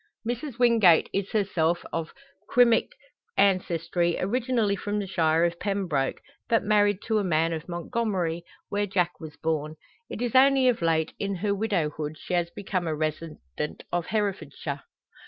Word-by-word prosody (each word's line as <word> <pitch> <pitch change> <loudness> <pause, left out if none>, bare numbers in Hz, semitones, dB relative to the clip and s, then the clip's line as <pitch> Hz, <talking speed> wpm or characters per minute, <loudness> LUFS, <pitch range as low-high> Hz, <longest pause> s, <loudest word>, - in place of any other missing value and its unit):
Mrs 240 +1 -4
Wingate 230 -9 +5
is 195 0 -1
herself 175 -6 0
of 165 -1 -3 0.4
Cymric 245 - +4 0.4
ancestry, 175 -3 +1
originally 230 0 +1
from 205 +1 -3
the 205 - -1
shire 165 -3 +2
of 170 0 -2
Pembroke, 185 -10 -1 0.3
but 230 - +3
married 205 -1 +2
to 220 -1 +1
a - - 0
man 165 -2 +1
of 160 +2 -6
Montgomery, 175 -2 -2 0.3
where 205 0 0
Jack 180 -2 0
was 155 -2 -9
born. 155 -1 -2 0.3
It - - -6
is 240 - -2
only 265 0 +5
of 245 -6 +2
late, 160 -1 +1
in 200 -1 -2
her 200 +3 0
widowhood, 160 -8 -2
she - - -6
has 175 -1 +1
become 185 -2 -3
a 155 - -1
resident 155 - -4
of 175 -1 -1
Herefordshire. 185 -9 -3
185 Hz, 155 wpm, -26 LUFS, 165-210 Hz, 0.4 s, Wingate